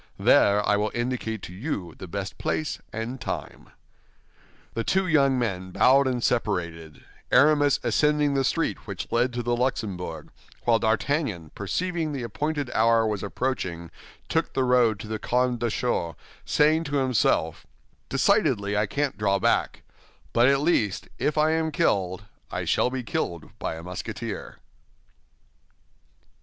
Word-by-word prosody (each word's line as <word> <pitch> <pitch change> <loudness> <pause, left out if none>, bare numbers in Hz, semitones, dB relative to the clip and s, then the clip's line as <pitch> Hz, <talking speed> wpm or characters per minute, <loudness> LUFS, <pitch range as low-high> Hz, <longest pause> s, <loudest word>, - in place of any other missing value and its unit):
There 100 +1 +4
I 105 - +3
will 105 +1 0
indicate 120 -3 -2
to 90 - -8
you 95 - -4
the 95 - -9
best 100 +2 -5
place 155 - -2
and 115 +4 -5
time." - - -6 1.0
The 115 - -2
two 190 +7 +1
young 140 -6 +3
men 95 -6 -2
bowed 135 +8 +4
and 125 -2 -1
separated, 85 -9 -2 0.3
Aramis 145 +1 +5
ascending 150 +4 +2
the 135 -1 +1
street - - -1
which - - -6
led 120 +2 +2
to 120 0 -3
the 120 +1 +1
Luxembourg, 95 -10 -3 0.3
while 115 -1 +3
D'Artagnan, 110 - 0
perceiving 165 - -2
the 135 -3 -4
appointed 145 +4 -2
hour 115 0 +3
was 105 -3 -1
approaching, 95 -5 -3 0.4
took - - -1
the 130 - +2
road 125 -4 +3
to 110 - -8
the 110 0 -3
Carmes 125 -1 0
Deschaux, 110 -8 -1 0.3
saying 155 +2 +3
to 145 -1 -3
himself, 125 - +1 0.4
"Decidedly 135 - +2
I 105 +1 +1
can't 140 0 -2
draw 100 -2 +2
back; - - 0 0.5
but 120 +2 +5
at 140 0 +3
least, 115 - +1
if 150 - 0
I 155 +1 +4
am 160 0 0
killed, 95 -7 0 0.3
I - - -3
shall - - +2
be 130 0 -4
killed 85 -7 -3
by - - -3
a 80 - -9
Musketeer." 90 0 -6
120 Hz, 145 wpm, -26 LUFS, 100-140 Hz, 1.0 s, Aramis